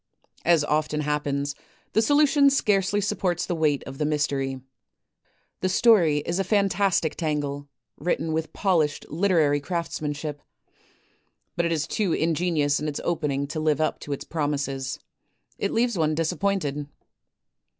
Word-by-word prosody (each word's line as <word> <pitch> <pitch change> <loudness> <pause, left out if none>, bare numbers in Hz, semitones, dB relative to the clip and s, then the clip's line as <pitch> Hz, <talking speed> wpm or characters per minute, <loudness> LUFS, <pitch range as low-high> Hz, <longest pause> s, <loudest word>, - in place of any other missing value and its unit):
' - - -32
As 160 -3 +3
often 150 0 0
happens, 145 -1 -1 0.4
the 220 - +4
solution 290 +2 +5
scarcely 205 -6 +2
supports 185 -4 -1
the 180 - -2
weight 155 -4 +1
of 135 0 -9
the - - +1
mystery. 140 -3 -1 1.0
The 185 - 0
story 180 -8 +4
is 175 +3 -1
a - - +2
fantastic 195 -5 +1
tangle, 145 -3 -2 0.3
written 160 0 -1
with 160 0 -2
polished 160 -7 +1
literary 160 -4 +2
craftsmanship. 150 -2 -4 1.1
But 170 - +1
it - - -2
is 155 -3 0
too 190 +2 0
ingenious 160 -3 +1
in 150 - -3
its 145 - -3
opening 150 -5 -1
to 155 - -3
live 155 -2 +1
up 155 - 0
to 145 - -8
its 140 - -3
promises. 140 -4 -2 0.6
It - - 0
leaves 235 -4 +1
one 155 -1 +2
disap 165 0 -1
pointed." 150 -8 -1
155 Hz, 145 wpm, -25 LUFS, 145-185 Hz, 1.1 s, solution